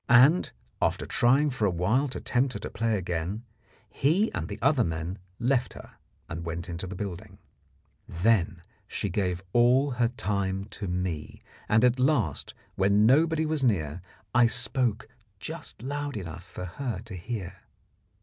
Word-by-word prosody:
and, 130 +9 +6 0.3
after - - +1
trying 140 +5 +3
for 110 -5 +1
awhile 100 +10 +1
to 130 - -4
tempt 125 +1 +1
her - - -5
to - - -6
play 115 -2 0
again, 90 +4 -3 0.4
he 175 +11 +1
and - - -3
the - - -6
other 135 -2 +3
men 80 +3 -3 0.2
left 125 0 +1
her - - -11 0.4
and 85 0 -5
went 85 +1 -4
into 85 +2 -5
the 95 - -6
building. 95 -2 -6 0.7
Then 90 -1 +1 0.2
she 100 - -2
gave 90 -1 -1
all 125 +4 +4
her 120 -1 +2
time 100 -4 -2
to 100 - -5
me, 90 -4 -3 0.3
and 110 +3 +5
at 125 +1 +3
last, 125 - +1 0.2
when 100 +2 +3
nobody 160 +5 +4
was 155 -2 0
near, 90 - +1 0.3
I 120 -1 +6
spoke 120 -1 -1 0.3
just - - -7
loud 145 -1 -3
enough 85 -3 -7
for 90 0 -7
her 115 +4 -4
to 115 - -9
hear. 95 +1 -5
110 Hz, 155 wpm, -28 LUFS, 90-130 Hz, 0.7 s, and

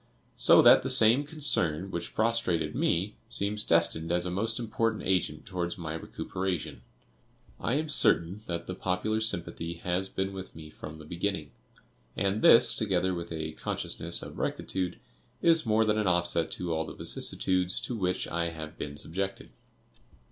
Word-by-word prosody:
So - - +6
that - - +8
the - - -3
same 115 +6 +5
concern 95 - 0
which 85 - -5
prostrated 110 -7 0
me 95 +5 0 0.2
seems 105 +1 -1
destined 85 -1 +2
as 90 0 +1
a 90 - -2
most 110 +5 -1
important 115 -1 -1
agent 90 -5 -1
towards 90 -3 -3
my 80 -3 -5
recuperation. 90 +1 -4 0.8
I 120 - 0
am 155 +2 -1
certain 95 - +3
that 85 -1 -4
the 95 - -5
popular 95 +4 -1
sympathy 85 -5 -2
has 90 +3 -2
been 95 +1 -3
with 95 -1 -8
me 80 -1 -10
from 75 0 -9
the 75 - -12
beginning; 85 -2 -3 0.7
and 100 +2 0
this, 115 - +7
together 95 -3 0
with 85 -1 -6
a 80 -1 -4
consciousness 85 +2 -1
of - - -9
rectitude, 90 -2 -2 0.5
is 165 -6 +4
more 110 +1 +3
than 110 0 +1
an 105 - 0
offset 85 -2 +1
to 85 -2 -3
all 80 0 0
the - - -7
vicissitudes 90 -1 -1
to - - -4
which 90 -4 -1
I 85 0 -1
have 80 -1 -8
been 75 0 -5
subjected. 95 +6 -4
90 Hz, 160 wpm, -29 LUFS, 85-105 Hz, 0.8 s, that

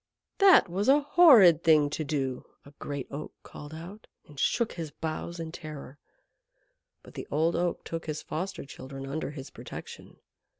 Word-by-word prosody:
"That 390 -2 +7
was 195 +7 -1
a 285 +2 +6
horrid 270 - +6
thing 155 -3 +5
to 155 - -3
do," 135 -3 -3 0.2
a 140 - -15
great 140 -2 -5
Oak 145 +2 -7
called 145 0 -11
out, 180 +7 -10 0.2
and 145 -2 -13
shook 235 -2 +1
his 165 -3 -6
boughs 160 +3 -5
in 165 -1 -5
terror. 150 -4 -9 1.0
But - - -15
the - - -7
Old 160 +4 +1
Oak 175 0 -1
took 165 -1 -6
his 155 -1 -4
foster 180 +3 -5
children 135 0 -9
under 140 +3 -4
his 140 -2 -9
protection. - - -10
160 Hz, 165 wpm, -28 LUFS, 145-175 Hz, 1.0 s, That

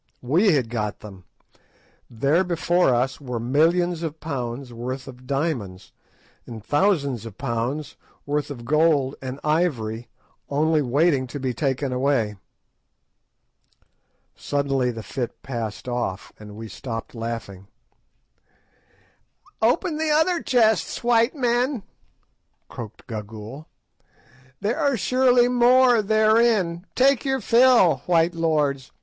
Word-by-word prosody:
We 175 - +3
had 125 -6 0
got 105 -3 -3
them: 95 -4 -12 0.8
there 140 +10 +1
before 175 -1 +1
us 125 +4 0
were 125 -4 -4
millions 165 +7 +1
of 160 -1 -5
pounds' 125 -4 -5
worth 125 +3 -5
of 125 -1 -12
diamonds, 135 - -3 0.6
and 110 -3 -9
thousands 145 - +1
of 105 - -12
pounds' 120 +6 -3 0.3
worth 145 0 -2
of 120 -5 -8
gold 150 -1 +2
and 130 +1 -6
ivory 125 -8 -1 0.4
only 155 +2 +2
waiting 140 +1 +1
to 135 +4 -7
be 130 -2 -2
taken 135 +1 -1
away. 125 -5 0 2.0
Suddenly 135 -3 -1
the 115 -2 -6
fit 120 +1 -5
passed 115 -4 -5
off, 120 -6 -3
and 105 -1 -11
we 110 +1 -8
stopped 115 +2 -7
laughing. 115 -5 -6 1.9
"Open 305 - +1
the 315 0 -1
other 320 +3 +2
chests, 225 -4 +1
white 235 +3 +3
men," 245 -2 0 0.9
croaked 110 -3 -9
Gagool, 110 +6 -8 0.9
"there 220 +9 -1
are 285 -5 +1
surely 250 +2 +3
more 245 -1 +5
therein. 215 -4 +2
Take 270 -1 +3
your 265 -1 0
fill, 235 - +5
white 170 -1 +3
lords! 150 -5 0
145 Hz, 115 wpm, -23 LUFS, 120-200 Hz, 2.0 s, more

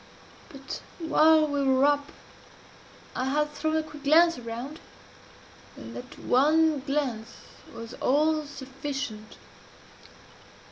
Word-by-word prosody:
But 275 -3 -8 0.2
while 315 -1 +4
we 285 -2 -1
were 265 0 +4
up 290 0 +1 1.0
I 255 - -1
had 300 +3 0
thrown 315 +1 -1
a 315 - 0
quick 305 -2 -12
glance 335 +4 +5
around 245 +6 -6 1.0
and - - -10
that 255 +4 -9
one 305 +3 +3
glance 265 -5 -2 0.4
was 230 0 -9
all 305 +3 +2
sufficient. 270 -5 -6
285 Hz, 105 wpm, -27 LUFS, 265-310 Hz, 1.0 s, glance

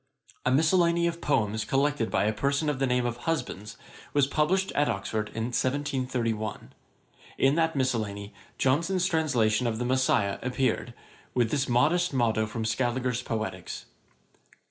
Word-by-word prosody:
A - - +3
Miscellany 170 +4 +3
of 170 0 -2
Poems 110 -6 +1
collected 135 +1 +1
by - - +1
a 105 +1 +1
person 140 +6 0
of 135 - -5
the 135 - +2
name 125 0 +1
of 120 -1 -2
Husbands, 115 -8 -3 0.4
was 145 -2 +4
published 165 +7 +1
at 145 -3 +1
Oxford 105 0 -2
in 115 +2 -3
1731. 125 -5 -2 0.6
In 135 +1 +4
that 165 0 +1
Miscellany 110 -6 -2 0.2
Johnson's 170 +7 +1
Translation 130 - +1
of 110 -1 -1
the 125 - -2
Messiah 125 -6 +1
appeared, 125 -1 -1 0.4
with 120 -3 +2
this 140 -3 0
modest 155 +8 +2
motto 110 -3 +2
from 110 0 -4
Scaliger's 125 +1 0
Poeticks. 110 -3 -4
130 Hz, 145 wpm, -27 LUFS, 115-145 Hz, 0.6 s, was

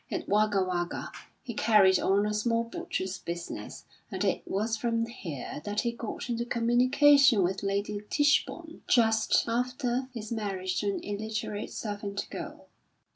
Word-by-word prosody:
At - - -4
Wagga 205 -1 +3
Wagga 175 -1 -3 0.3
he 240 - -5
carried 210 -4 +5
on 200 +2 +2
a 210 - -1
small 230 +2 +1
butcher's 190 -4 -4
business, 170 -11 -6 0.2
and - - -3
it - - +1
was 215 +3 0
from 230 0 0
here 170 - -7
that 205 +2 -1
he 235 - 0
got 235 0 -6
into 235 -1 -1
communication 250 +1 +4
with 190 +2 -1
Lady 200 +1 -2
Tichborne 315 +3 +1
just 225 -2 +3
after 250 +2 -1
his 225 -3 -7
marriage 195 -5 -2
to 205 - -2
an 200 - -3
illiterate 215 0 -4
servant 205 -2 -4
girl. - - -7
215 Hz, 145 wpm, -29 LUFS, 200-235 Hz, 0.3 s, carried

